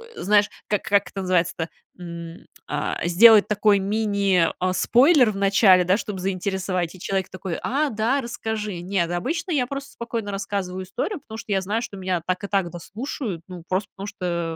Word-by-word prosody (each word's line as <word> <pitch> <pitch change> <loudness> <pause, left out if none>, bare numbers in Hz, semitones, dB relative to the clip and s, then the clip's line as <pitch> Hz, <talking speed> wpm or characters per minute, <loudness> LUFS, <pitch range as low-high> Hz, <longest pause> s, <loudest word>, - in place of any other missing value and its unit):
знаешь, 205 +1 +3 0.2
как, 210 - 0
как 200 -2 +2
это 195 - -5
называется-то? 170 -2 0 0.3
М, 170 -1 -8 0.2
а, - - -2
сделать 210 +5 +7
такой 210 -1 +3
мини, 200 -3 +1
а, 185 0 +1
спойлер 250 - +5
в 195 - -7
начале, 195 -2 +5
да, 185 +3 +3
чтобы 210 -3 -5
заинтересовать, 185 -2 -2
и - - -13
человек 190 0 -2
такой: 185 -2 -5
"А, 290 +3 +1
да, 230 +5 0
расскажи". 220 -5 -4
Нет, 175 -2 -1
обычно 305 - -2
я 275 -6 +2
просто 275 +1 -6
спокойно 230 -3 -4
рассказываю 195 -2 -3
историю, 330 - -3
потому 220 -1 -9
что 220 - -7
я 195 -1 +2
знаю, 210 +4 -1
что 205 -4 -7
меня 185 -2 -1
так 185 +2 -2
и - - -3
так 195 -3 0
дослушают, 195 - -5
ну, 180 -2 -9
просто 185 +2 -1
потому 195 +1 -6
что, 170 -5 -3
195 Hz, 180 wpm, -23 LUFS, 180-220 Hz, 0.3 s, сделать